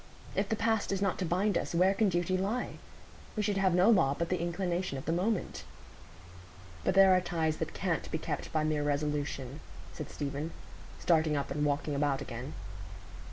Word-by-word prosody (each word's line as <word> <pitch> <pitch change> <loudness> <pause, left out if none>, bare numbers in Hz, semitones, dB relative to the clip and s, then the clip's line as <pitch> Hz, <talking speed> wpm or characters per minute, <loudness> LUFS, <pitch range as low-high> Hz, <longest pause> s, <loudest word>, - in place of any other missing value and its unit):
If 195 0 0
the 220 - +2
past 220 -2 +1
is 195 - 0
not 195 -2 0
to 185 - -1
bind 185 +3 +2
us, - - -4
where 185 +3 +5
can 205 0 +2
duty 175 +1 0
lie? 205 +7 -2 0.6
We 215 - 0
should 205 -1 0
have 190 -2 +3
no 180 +3 +5
law 170 -12 +5
but 170 - -1
the 180 -2 0
inclination 175 -2 -1
of 135 - -7
the 160 - 0
moment." 185 +4 -1 1.2
"But - - +1
there 195 -1 +8
are 185 - +4
ties 160 -3 0
that 160 -1 -4
can't 180 -4 -1
be - - -1
kept - - -4
by 155 -1 +1
mere 155 -1 +1
resolution," 145 -2 -2 0.3
said - - -6
Stephen, 145 +2 -4 0.4
starting 155 -3 +2
up 140 - -3
and 150 - -1
walking 145 +1 0
about 140 -1 +1
again. 130 +1 -6
170 Hz, 190 wpm, -31 LUFS, 150-195 Hz, 1.2 s, there